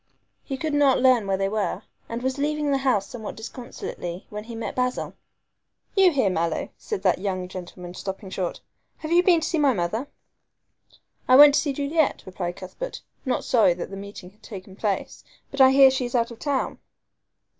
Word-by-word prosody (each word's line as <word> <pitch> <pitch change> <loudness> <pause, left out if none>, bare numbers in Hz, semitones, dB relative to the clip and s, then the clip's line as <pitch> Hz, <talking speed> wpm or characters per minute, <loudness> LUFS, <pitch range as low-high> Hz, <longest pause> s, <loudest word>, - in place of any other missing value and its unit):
He 270 - -4
could 310 +2 -3
not 285 -3 +4
learn 250 -5 +4
where 195 -1 +1
they 195 0 0
were, 200 -1 -2 0.3
and 235 +1 -4
was 260 +1 -1
leaving 300 0 0
the 275 - +2
house 255 -8 +1
somewhat 220 -4 -7
disconsolately 220 -6 -7
when 210 0 -6
he 230 0 -8
met 225 - -5
Basil. 250 0 -1 0.8
"You 385 -2 +6
here, 260 - +2
Mallow," 165 -2 -1
said 430 -3 -5
that - - +3
young 185 -2 -2
gentleman, 180 -1 -8
stopping 190 +1 -6
short, 185 -3 -3 0.4
"have 310 0 -6
you 345 +1 +6
been 350 -2 +4
to - - -1
see 330 - 0
my 280 -3 +4
mother?" 215 +7 -2 1.2
"I 255 - +6
went 290 +1 +10
to - - +4
see 290 - -1
Juliet," 285 +3 0
replied 180 -1 -4
Cuthbert, - - -7 0.2
not 255 - 0
sorry 220 -8 +4
that 180 - -6
the - - -6
meeting 195 -2 -9
had 210 - -31
taken 190 -3 -10
place, 205 -1 -3 0.3
"but 275 - 0
I 260 - +9
hear 270 0 +7
she 260 -1 -1
is 245 - -4
out 235 0 +1
of 235 - -11
town." 280 -3 -2
240 Hz, 195 wpm, -24 LUFS, 195-280 Hz, 1.2 s, went